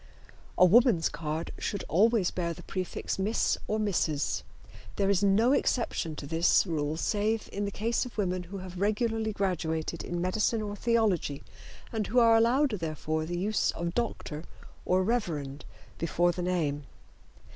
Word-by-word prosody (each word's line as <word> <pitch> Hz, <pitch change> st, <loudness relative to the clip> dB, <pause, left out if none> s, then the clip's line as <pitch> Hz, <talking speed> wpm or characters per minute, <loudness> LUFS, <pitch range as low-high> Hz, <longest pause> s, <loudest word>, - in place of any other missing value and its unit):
A 180 Hz, -, +7 dB
woman's 210 Hz, -3 st, +5 dB
card 155 Hz, +1 st, -4 dB
should 200 Hz, -, -3 dB
always 210 Hz, +1 st, +3 dB
bear 170 Hz, -2 st, -2 dB
the -, -, -12 dB
prefix 185 Hz, 0 st, -4 dB
"Miss" 210 Hz, +4 st, +1 dB
or 215 Hz, -, 0 dB
"Mrs." 170 Hz, -8 st, 0 dB, 0.5 s
There 195 Hz, -1 st, +2 dB
is 200 Hz, 0 st, +2 dB
no 210 Hz, +5 st, +4 dB
exception 230 Hz, -, 0 dB
to 145 Hz, -, -7 dB
this 165 Hz, +6 st, +3 dB
rule 155 Hz, -3 st, -2 dB
save 215 Hz, +5 st, 0 dB
in 205 Hz, +1 st, -2 dB
the -, -, -1 dB
case 225 Hz, +4 st, 0 dB
of 250 Hz, -, -9 dB
women 185 Hz, -3 st, 0 dB
who 200 Hz, -, -6 dB
have 185 Hz, -1 st, -8 dB
regularly 220 Hz, +1 st, 0 dB
graduated 170 Hz, -5 st, -2 dB
in 175 Hz, -, -3 dB
medicine 215 Hz, +5 st, 0 dB
or 205 Hz, -1 st, -4 dB
theology 205 Hz, -11 st, +1 dB, 0.5 s
and 220 Hz, -2 st, -1 dB
who 250 Hz, -, -2 dB
are 230 Hz, -1 st, +6 dB
allowed 245 Hz, +5 st, +3 dB
therefore 155 Hz, -1 st, -2 dB
the 175 Hz, +1 st, -3 dB
use 205 Hz, +4 st, +1 dB
of 170 Hz, 0 st, -3 dB
"Dr." 165 Hz, -9 st, -3 dB, 0.4 s
or 185 Hz, +1 st, +2 dB
"Rev." 160 Hz, -, -2 dB, 0.4 s
before 175 Hz, +1 st, +2 dB
the 180 Hz, -, -5 dB
name. 155 Hz, -6 st, -1 dB
185 Hz, 155 wpm, -29 LUFS, 165-220 Hz, 0.5 s, A